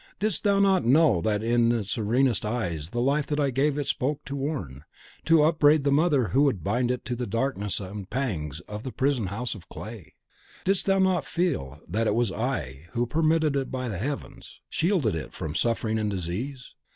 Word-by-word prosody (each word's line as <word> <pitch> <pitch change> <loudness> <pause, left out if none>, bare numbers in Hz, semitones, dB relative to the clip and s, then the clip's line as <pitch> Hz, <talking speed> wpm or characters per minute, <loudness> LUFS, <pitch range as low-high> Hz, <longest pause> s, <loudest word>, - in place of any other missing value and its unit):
Didst 205 -3 0
thou 200 -1 +3
not 195 -2 +4
know 135 - +4
that 105 +3 0
in 115 0 +3
its 110 -4 -2
serenest 120 +1 +1
eyes 85 -9 -2
the 120 - -3
life 140 +4 +1
that 150 0 -1
I 140 -2 +2
gave 140 +3 +1
it 145 - -1
spoke 145 +2 -1
to 140 - -5
warn, 135 - -4 0.4
to 165 -2 +5
upbraid 155 -2 +4
the 140 - +2
mother 145 - +3
who 135 - +3
would 130 - +2
bind 120 +5 0
it 125 -1 -2
to 120 - -2
the 125 0 -3
darkness 105 -3 -1
and 100 0 -7
pangs 85 - -3
of 105 +4 -7
the 130 - -6
prison 130 -6 0
house 115 +5 -3
of 95 -5 -12
clay? 110 -5 -9 0.5
Didst 195 0 +1
thou 195 0 +4
not 190 -2 +2
feel 75 - -2
that 110 +6 0
it 105 - +2
was 120 -4 +1
I 90 - -3
who, 120 0 +1
permitted 155 0 +1
by 130 -2 -3
the 100 -5 -4
Heavens, 135 +1 -6
shielded 165 - +1
it 80 - -5
from 75 -2 -5
suffering 110 +1 0
and 105 -1 0
disease? 105 +9 -4
125 Hz, 200 wpm, -26 LUFS, 105-145 Hz, 0.5 s, to